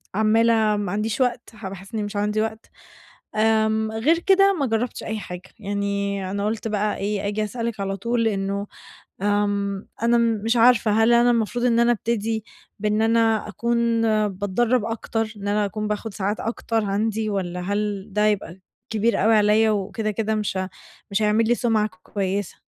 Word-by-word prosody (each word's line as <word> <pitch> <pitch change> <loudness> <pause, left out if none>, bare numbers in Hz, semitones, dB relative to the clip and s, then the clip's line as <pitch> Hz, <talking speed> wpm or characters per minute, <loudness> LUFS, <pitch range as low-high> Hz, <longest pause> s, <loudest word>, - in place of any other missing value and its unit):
عمّالة 225 +2 +4 0.2
ما 205 -3 -2
عنديش 215 +4 -1
وقت 245 -1 0
ح 210 -2 -7
باحس 195 +3 -11
إنّي 215 -2 -1
مش 205 0 -6
عندي 210 +1 0
وقت. 220 0 -4 0.7
آمم 220 0 +2
غير 270 +10 +2
كده، 390 +2 +4
ما 280 - +1
جرّبتش 230 0 -2
أي 220 0 -3
حاجة. 180 -2 -7 0.2
يعني 200 -1 -2
أنا 200 +1 -2
قُلت 220 +1 -2
بقى 210 -1 -1
إيه، 200 0 -2
أجي 210 +1 -1
أسألِك 230 0 -4
على 195 0 -2
طول 230 +3 0
إنه 200 -1 -2 0.6
آمم 205 -1 0 0.2
أنا 235 +1 +4
م 230 -2 +1
مش 230 +2 +2
عارفة، 235 -1 +5
هل 225 +2 +4
أنا 240 +1 +5
المفروض 240 +1 0
إن 235 -1 +3
أنا 235 0 +4
ابتدي 225 -1 -2 0.4
بإن 210 +1 +1
أنا 225 -1 +2
أكون 235 +1 0 0.3
باتدرّب 205 +5 0
أكتر، 225 -1 -2
إن 200 0 -5
أنا 210 +1 +2
أكون 210 +1 -3
باخُد 210 0 -3
ساعات 205 +1 -2
أكتر 225 -1 -2
عندي، 215 +2 -1
والّا 180 -3 -3
هل 205 +1 -2
ده 210 +1 +2
يبقى 190 -3 -1 0.3
كبير 220 -1 +1
أوي 225 +1 +5
عليّا، 215 +1 +4
وكده، 210 +1 -1
كده 220 +1 -1
مش 210 -2 -2
ه 190 0 -2 0.4
مش 205 +2 +1
هيعمل 215 +1 +3
لي 240 - +4
سُمعَة 225 -3 +1
ك 185 - -23
كويسة؟ 195 -1 -3
215 Hz, 175 wpm, -23 LUFS, 200-225 Hz, 0.7 s, عارفة